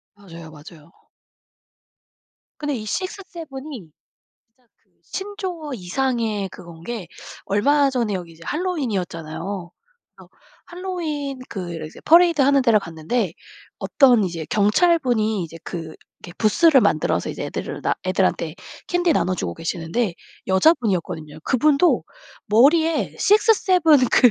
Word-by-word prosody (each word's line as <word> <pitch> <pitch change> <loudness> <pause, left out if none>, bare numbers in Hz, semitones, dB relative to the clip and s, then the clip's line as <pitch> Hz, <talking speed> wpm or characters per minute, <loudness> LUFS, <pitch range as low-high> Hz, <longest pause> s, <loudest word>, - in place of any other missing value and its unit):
맞아요. 170 -5 -12
맞아요. 155 +1 -14 1.7
근데 295 -2 -2
이 220 - -5
6-7 325 - -6
이 195 - -9 0.7
진짜 250 0 -36
그 - - -43
신조어 380 -6 -6
이상의 220 0 -1
그건 170 -2 -13
게 225 -1 -5 0.4
얼마 280 +8 +3
전에 235 -6 -1
여기 175 -3 -6
이제 165 +1 -18
핼러윈이었잖아요. 195 - -3 0.5
그래서 - - -16 0.4
핼러윈 325 -7 -4
그 180 -4 -5
이제 155 - -13
퍼레이드 335 -1 +5
하는 275 0 +4
데를 230 -4 +4
갔는데 175 +3 -2 0.5
어떤 250 -7 +4
이제 170 -4 -4
경찰분이 220 - +2
이제 165 0 -10
그 165 -2 -6 0.3
이렇게 175 - -10
부스를 275 +6 +5
만들어서 - - +1
이제 - - -5
애들을 - - -5
나 - - +1
애들한테 - - 0 0.3
캔디 355 -1 +2
나눠주고 180 - -1
계시는데 170 +5 -2 0.3
여자분이었거든요. 185 - +1
그분도 300 +6 +3 0.4
머리에 315 +9 +3
6-7 365 - +4
그 245 - +6
235 Hz, 280 characters per minute, -22 LUFS, -, 1.7 s, 그